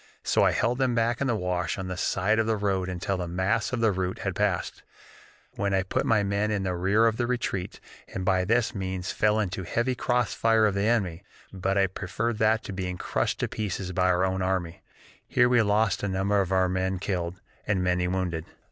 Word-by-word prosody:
So - - +2
I - - +4
held 120 +2 0
them 130 -2 +1
back 115 +1 +1
in 140 - +1
the 120 - +1
wash 90 -3 -1
on 95 -1 -4
the 90 - -4
side 95 +5 +1
of 110 - +1
the 110 -1 +1
road 95 -2 0
until 95 +1 -2
the 90 -1 -3
mass 95 +5 0
of 130 -2 -2
the 110 -2 +4
rout 95 -1 -2
had 95 - -3
passed, 100 -4 -1 0.7
when 100 -1 -1
I 95 - +2
put 95 - -1
my 110 -2 +3
men 100 +2 0
in 105 -2 -1
the 95 -1 -1
rear 100 +6 +3
of 115 -1 +2
the 120 0 0
retreat, 120 -7 -2 0.3
and 95 - -5
by 95 -1 +2
this 115 +4 +1
means 95 -2 -3
fell 105 0 +2
into 95 -2 -2
a - - -7
heavy 120 +8 0
cross 125 -1 0
fire 115 -1 +3
of 105 - +2
the 100 +1 0
enemy, 95 -8 0 0.3
but 95 +1 -1
I 100 - +5
preferred 105 +4 -3
that 110 0 +3
to 100 - -6
being 90 -1 -3
crushed - - -1
to - - +1
pieces 95 -3 -4
by 90 0 +1
our 90 +1 +3
own 95 0 -1
army. 95 -3 -2 0.5
Here 125 -1 +4
we 125 -1 +4
lost 105 0 +2
a 100 - -1
number 100 +1 +1
of 95 -1 -3
our 95 -1 +3
men 95 +1 -1
killed, 90 -2 -3 0.3
and 95 -3 +1
many 90 0 +1
wounded. 90 -3 -2
95 Hz, 230 wpm, -27 LUFS, 90-110 Hz, 0.7 s, I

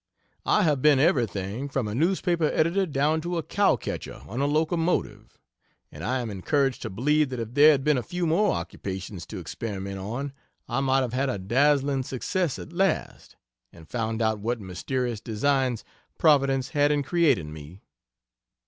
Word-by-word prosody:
I 210 - +4
have 150 -6 +2
been 150 -1 +5
everything, 120 - 0
from 135 -5 -1
a 105 - -4
newspaper 170 - +1
editor 170 +5 +1
down 150 +2 +1
to 175 +1 -3
a 165 - -2
cow 200 +6 +2
catcher - - -6
on 120 +6 -3
a 140 - +2
locomotive, 160 +3 -1 0.5
and 75 - -9
I 130 +6 0
am 115 -3 -4
encouraged 135 +7 0
to - - -4
believe 145 +8 +1
that 125 -2 -5
if 115 0 -5
there 145 +3 +7
had 140 -3 +3
been 150 -3 +3
a - - -3
few 175 +10 -3
more 180 +6 +3
occupations 95 +2 -5
to - - -7
experiment 100 -3 -5
on, 120 +8 -4 0.3
I 120 +2 -1
might 135 0 +2
have 125 -3 -2
made 135 +2 0
a 125 - -1
dazzling 135 +7 +2
success 135 +5 -2
at 165 - -9
last, 190 -1 -1 0.4
and 80 -1 -15
found 115 +1 -2
out 110 -1 +1
what 115 +3 -2
mysterious 110 +5 -3
designs 125 +1 0 0.3
Providence 135 -4 +3
had 145 0 +2
in 145 -1 +1
creating 135 - +1
me. 80 +5 -11
135 Hz, 175 wpm, -26 LUFS, 110-150 Hz, 0.5 s, there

